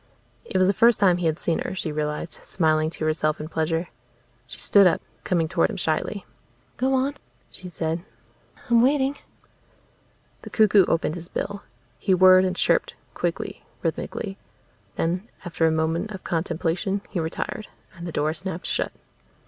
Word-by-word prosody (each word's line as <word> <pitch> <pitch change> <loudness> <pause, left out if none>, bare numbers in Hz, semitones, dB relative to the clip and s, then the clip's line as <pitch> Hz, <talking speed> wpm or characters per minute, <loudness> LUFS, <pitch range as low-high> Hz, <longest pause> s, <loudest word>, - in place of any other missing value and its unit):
It - - -2
was 185 - +5
the 195 - +3
first 230 +2 +5
time 185 -4 +5
he 175 -2 0
had 160 -1 0
seen 170 -2 0
her, - - -3
she 170 -4 -3
realized, 150 +2 -3
smiling 155 -2 +1
to 160 -1 -5
herself 155 0 +1
in 155 - -5
pleasure. 165 +2 -1 0.6
She - - -10
stood 200 -2 +6
up, 175 - +2 0.2
coming 170 -3 +1
toward 165 +1 +2
him 215 - -5
shyly. 185 +4 -1 0.5
"Go 265 +1 +2
on," 265 +2 +1 0.4
she 180 0 -7
said. 165 0 -2 0.6
"I'm 235 -1 +5
waiting." 270 +2 +3 1.3
The - - -9
cuckoo 210 -3 +5
opened 165 -2 +1
his 170 0 -6
bill. 200 +2 -4 0.4
He 190 -2 +3
whirred 185 0 +7
and 185 0 -1
chirped, - - +1 0.2
quickly, - - -3 0.2
rhythmically. 195 -2 -3 0.6
Then, 180 +6 -1 0.2
after 165 -1 +1
a - - +3
moment 160 +5 0
of 190 -3 -8
contemplation, 170 +3 -1
he 185 - -1
retired. 165 +5 -3 0.3
And 170 -1 -7
the - - -4
door 155 0 0
snapped 180 0 -5
shut. - - -1
175 Hz, 165 wpm, -24 LUFS, 160-200 Hz, 1.3 s, whirred